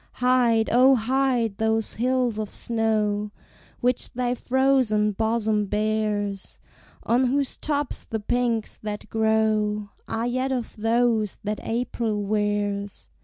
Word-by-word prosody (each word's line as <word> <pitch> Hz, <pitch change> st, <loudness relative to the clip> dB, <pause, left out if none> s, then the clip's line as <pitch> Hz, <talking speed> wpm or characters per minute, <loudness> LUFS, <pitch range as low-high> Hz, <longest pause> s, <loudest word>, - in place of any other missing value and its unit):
Hide, 245 Hz, -3 st, +3 dB
O, 260 Hz, +3 st, +6 dB
hide 245 Hz, -3 st, 0 dB
those 220 Hz, 0 st, 0 dB
hills 250 Hz, -2 st, 0 dB
of 215 Hz, -1 st, -3 dB
snow 215 Hz, -2 st, -1 dB, 0.5 s
Which 245 Hz, 0 st, +1 dB
thy 245 Hz, 0 st, 0 dB
frozen 250 Hz, -5 st, +2 dB
bosom 220 Hz, -1 st, 0 dB
bears, 210 Hz, -1 st, -1 dB, 0.5 s
On 245 Hz, +3 st, +2 dB
whose 275 Hz, +2 st, 0 dB
tops 290 Hz, -2 st, -2 dB
the 220 Hz, -, -4 dB
pinks 235 Hz, 0 st, -1 dB
that 210 Hz, 0 st, -6 dB
grow 215 Hz, -1 st, +1 dB, 0.2 s
Are 225 Hz, +1 st, -2 dB
yet 255 Hz, +2 st, -1 dB
of 250 Hz, -3 st, -3 dB
those 225 Hz, -1 st, +1 dB
that 210 Hz, 0 st, -2 dB
April 225 Hz, -2 st, -2 dB
wears! 205 Hz, -1 st, -2 dB
225 Hz, 120 wpm, -24 LUFS, 210-245 Hz, 0.5 s, O